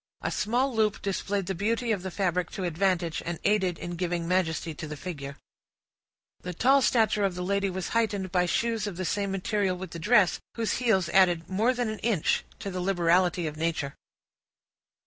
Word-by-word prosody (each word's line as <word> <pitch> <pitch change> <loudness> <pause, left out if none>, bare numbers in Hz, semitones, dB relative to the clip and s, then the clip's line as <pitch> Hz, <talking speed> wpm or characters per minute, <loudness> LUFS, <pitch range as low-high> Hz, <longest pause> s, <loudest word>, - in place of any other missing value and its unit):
A - - -1
small 245 +5 0
loop 215 -2 +2
displayed 200 0 -1
the 190 - -2
beauty 225 +6 0
of 205 -4 0
the 190 - -4
fabric 180 -1 -1
to 190 - -4
advantage, 175 -1 0
and 170 -1 -3
aided 190 -4 +2
in 175 - -6
giving 175 -1 -2
majesty 170 -3 0
to 155 - -7
the 150 0 -6
figure. 140 -5 -6 1.0
The 180 -1 -6
tall 270 +8 +4
stature 220 -4 +2
of 195 -3 0
the 180 - -3
lady 200 +1 0
was 185 0 -4
heightened 205 -5 0
by 180 0 +2
shoes 225 +2 0
of 190 -4 -5
the 185 - -3
same 200 +2 -1
material 195 -1 0
with 185 -2 -7
the 170 - -6
dress, 210 +1 +4 0.2
whose 225 -2 -1
heels 220 -8 +2
added 175 -2 +3
more 215 +6 +2
than 245 -2 -1
an 215 -1 -4
inch 210 -9 +1
to 195 - -5
the 180 0 -3
liberality 175 -1 +2
of 155 -1 -4
nature. 160 -4 -1
190 Hz, 190 wpm, -27 LUFS, 175-210 Hz, 1.0 s, tall